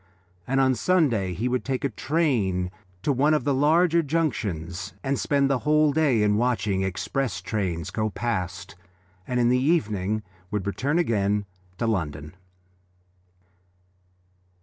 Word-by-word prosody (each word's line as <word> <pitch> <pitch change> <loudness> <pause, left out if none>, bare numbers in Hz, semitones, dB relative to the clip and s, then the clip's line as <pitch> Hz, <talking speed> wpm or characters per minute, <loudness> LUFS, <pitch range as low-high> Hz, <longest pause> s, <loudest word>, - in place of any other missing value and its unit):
And 135 +1 +1
on 130 -1 +4
Sunday 120 - +1
he 115 +8 -1
would 125 0 -1
take 130 -1 -2
a 140 - +1
train 110 - 0 0.3
to 145 - +2
one 145 +4 +3
of 150 - 0
the 140 - +1
large 160 +5 +3
junctions 95 - -2
and 135 0 0
spend 140 -1 +2
the 135 -2 +1
whole 150 0 +3
day 140 -8 +3
in 105 0 +3
watching 110 -5 0
express 95 +6 -2
trains 90 -4 -3
go 110 -1 -1
past, 100 -4 -3 0.5
and 125 -1 0
in 120 0 +3
the 125 +1 +3
evening 110 - 0 0.3
would 105 -2 -2
return 135 +10 -1
again 105 - +1 0.3
to 115 - -1
London. 75 -8 -2
120 Hz, 140 wpm, -25 LUFS, 100-140 Hz, 0.5 s, on